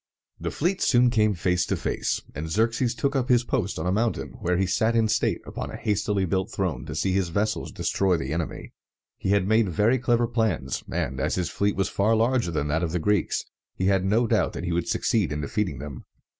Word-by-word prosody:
The - - -3
fleets 180 +5 0
soon 125 -1 +5
came 110 -3 +2
face 90 +1 +1
to - - 0
face; - - -2
and 80 +1 -5
Xerxes 115 +5 +1
took 140 +2 -1
up 130 0 0
his 120 -1 +4
post 100 -4 -1
on 80 - -3
a 90 - +1
mountain, 110 +4 0
where 90 0 0
he 95 - +2
sat 110 +5 +1
in 115 -1 +3
state - - +1
upon - - -5
a - - -7
hastily 105 -1 0
built 95 +4 -1
throne 90 - -2
to - - -5
see 95 - 0
his 95 -2 +1
vessels 105 +5 -1
destroy 95 -3 +1
the 70 -1 -3
enemy. 80 0 -4 0.5
He - - -2
had 100 -1 +3
made 110 -1 +3
very 105 +9 +2
clever 120 0 +2
plans, 110 - -1
and, - - -2
as - - 0
his 90 -3 -2
fleet 100 0 0
was 95 -1 +1
far 105 +4 +2
larger 115 -2 +2
than 75 -3 -1
that 80 +3 +1
of 85 -2 -2
the - - +1
Greeks, 105 +1 0 0.3
he 95 - -2
had 95 -1 +3
no 110 +5 +2
doubt 110 -6 +1
that - - -5
he 90 - -2
would 85 0 -1
succeed 100 -10 +1
in 75 0 -2
defeating 80 - -2
them. 70 0 -8
100 Hz, 225 wpm, -25 LUFS, 90-115 Hz, 0.5 s, soon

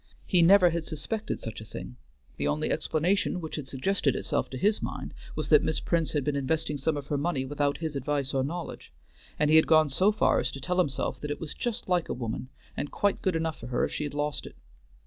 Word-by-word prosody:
He 180 - +4
never 180 +1 +7
had 170 0 -1
suspected 185 +9 -3
such 115 -1 -6
a - - -6
thing; 60 - -8 0.4
the 70 - 0
only 75 +1 0
explanation 180 +4 +1
which 160 -2 -5
had 150 -4 -5
suggested 140 +2 0
itself - - -1
to 130 - -6
his 210 - +2
mind - - -5 0.2
was - - -3
that - - +7
Miss - - 0
Prince 165 -2 0
had 145 -3 +1
been 145 +1 0
investing 150 +2 0
some 150 +3 0
of 140 - -5
her 145 0 -1
money 145 -4 0
without 145 +1 0
his 160 -3 -4
advice 140 0 -1
or 135 -1 +2
knowledge, 170 +5 -5 0.5
and 150 0 +3
he 160 - +8
had 160 - +5
gone 155 -2 +5
so 190 +9 +4
far 215 - +3
as - - 0
to 135 - -6
tell 180 +6 -1
himself 140 -7 0
that 150 - -4
it 145 - -3
was 160 - -4
just 240 -3 -3
like 180 -2 +1
a - - -1
woman, 120 +1 -4 0.3
and 145 - -3
quite 205 -1 0
good 185 -3 +1
enough 160 -1 -1
for 120 - -8
her 125 - +1
if - - -5
she - - -2
had 145 - -5
lost 145 -1 -2
it. - - -12
150 Hz, 245 wpm, -28 LUFS, 135-170 Hz, 0.5 s, he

